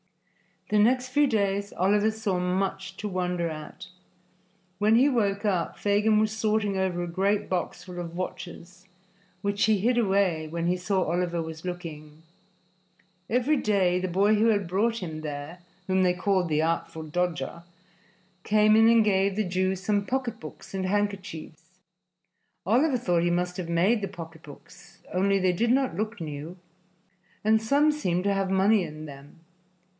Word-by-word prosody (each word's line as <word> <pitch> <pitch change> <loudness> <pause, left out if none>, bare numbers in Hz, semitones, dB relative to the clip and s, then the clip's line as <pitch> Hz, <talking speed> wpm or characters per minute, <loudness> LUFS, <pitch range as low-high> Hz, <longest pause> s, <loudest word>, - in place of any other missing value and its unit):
The 210 - +3
next 250 +4 +3
few 290 +3 +3
days 200 -3 0
Oliver 205 +4 +2
saw 215 -4 -2
much 190 +1 -2
to 210 - -4
wonder 180 -2 -1
at. 160 +4 -8 0.9
When 215 +2 +4
he 265 +5 +5
woke 205 -5 0
up, 185 -6 -1
Fagin 210 +1 +2
was 215 0 +2
sorting 215 -2 0
over 185 -2 -1
a - - -4
great 195 +4 0
box 180 -1 -3
full 180 -1 -8
of 170 -1 -6
watches, 180 0 -7 0.5
which 200 0 +1
he 215 -1 +3
hid 240 +5 +1
away 190 -7 +1
when 165 +2 -3
he 180 +1 +1
saw 190 +1 0
Oliver 175 0 -1
was 160 +1 -8
looking. 160 -4 -7 1.1
Every 255 +6 +2
day 190 -6 +2
the 185 - -2
boy 200 +4 +3
who 215 +2 +3
had 205 -3 +2
brought 225 +6 0
him 155 -3 -5
there, 150 +3 -6 0.3
whom 190 0 +1
they 180 -1 +3
called 185 0 0
"the 155 -1 +1
Artful 160 -1 -2
Dodger," 170 +1 -3 0.8
came 215 0 +4
in 225 0 +6
and 230 -1 +6
gave 195 -1 +2
the 215 - +1
Jew 185 0 0
some 200 +2 -1
pocketbooks 240 -5 -5
and 190 -1 -2
handkerchiefs. 185 -4 -4 0.9
Oliver 255 - +3
thought 175 -8 +1
he 175 - +2
must 180 +1 -1
have 175 -3 -5
made 190 +7 +2
the 200 - -2
pocketbooks, 165 -5 -12
only 195 +2 +2
they 185 -1 +2
did 230 +7 0
not 265 +1 +1
look 215 -1 -3
new, 155 +3 -6 0.9
and 220 +1 +3
some 285 +7 +3
seemed 180 - -1
to 200 0 +1
have 195 -1 -1
money 195 +2 +3
in 155 -1 -7
them. 140 +2 -13
190 Hz, 160 wpm, -26 LUFS, 175-215 Hz, 1.1 s, in